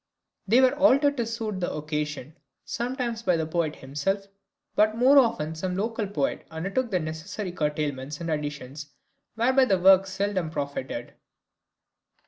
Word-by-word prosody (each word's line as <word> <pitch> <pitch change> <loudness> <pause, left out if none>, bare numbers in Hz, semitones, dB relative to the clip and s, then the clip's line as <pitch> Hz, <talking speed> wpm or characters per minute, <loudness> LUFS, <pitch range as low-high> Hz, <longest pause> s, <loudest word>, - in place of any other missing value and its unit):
They 235 +6 +5
were 260 +1 +4
altered 285 0 +4
to 235 -2 -1
suit 225 -4 -3
the 175 - -2
occasion 150 -1 -4 0.3
sometimes 240 -1 -3
by 180 -7 +2
the 160 - -1
poet 160 -1 -1
himself, 150 +9 -2 0.5
but 215 +1 +3
more 265 +4 +7
often 225 - +1
some 180 +3 -3
local 220 +1 -1
poet 150 -8 -2
undertook 195 +10 -2
the 185 -4 +1
necessary 175 +5 -5
curtailments 150 -3 -2
and 170 -1 -3
additions, 145 -1 -4 0.5
whereby 260 +4 +4
the 195 -6 +2
work 190 +1 +6
seldom 190 -3 -1
profited. 140 -5 -4
185 Hz, 140 wpm, -26 LUFS, 150-225 Hz, 0.5 s, more